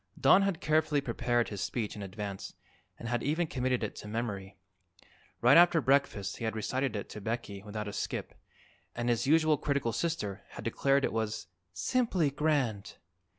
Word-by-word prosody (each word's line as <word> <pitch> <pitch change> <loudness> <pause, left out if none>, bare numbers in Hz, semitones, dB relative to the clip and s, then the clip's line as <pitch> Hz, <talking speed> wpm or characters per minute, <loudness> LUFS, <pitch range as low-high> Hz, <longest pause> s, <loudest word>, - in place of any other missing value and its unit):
Don 195 - +6
had 195 -4 0
carefully 155 -1 +2
prepared 120 -2 0
his 105 -2 -5
speech 105 +1 -2
in 105 - -7
advance 100 0 -6 0.4
and 115 - -7
had 120 0 0
even 160 +4 +1
committed 130 -4 -1
it 105 - -3
to - - -8
memory. 105 -3 -4 0.8
Right 125 +6 +7
after 175 -1 +7
breakfast 135 -8 +1
he - - -7
had 110 0 -1
recited 130 +4 -1
it 100 - -4
to 105 - -8
Becky 105 -2 -4
without 105 +1 -5
a 100 - -5
skip, - - -3 0.6
and 120 0 -1
his 120 +2 +1
usually 155 0 +4
critical 140 -5 -1
sister 115 - -2
had - - -7
declared 140 0 +2
it - - -2
was 110 -3 -2 0.3
"simply 170 - +1
grand." 135 -8 0
120 Hz, 170 wpm, -31 LUFS, 105-145 Hz, 0.8 s, Right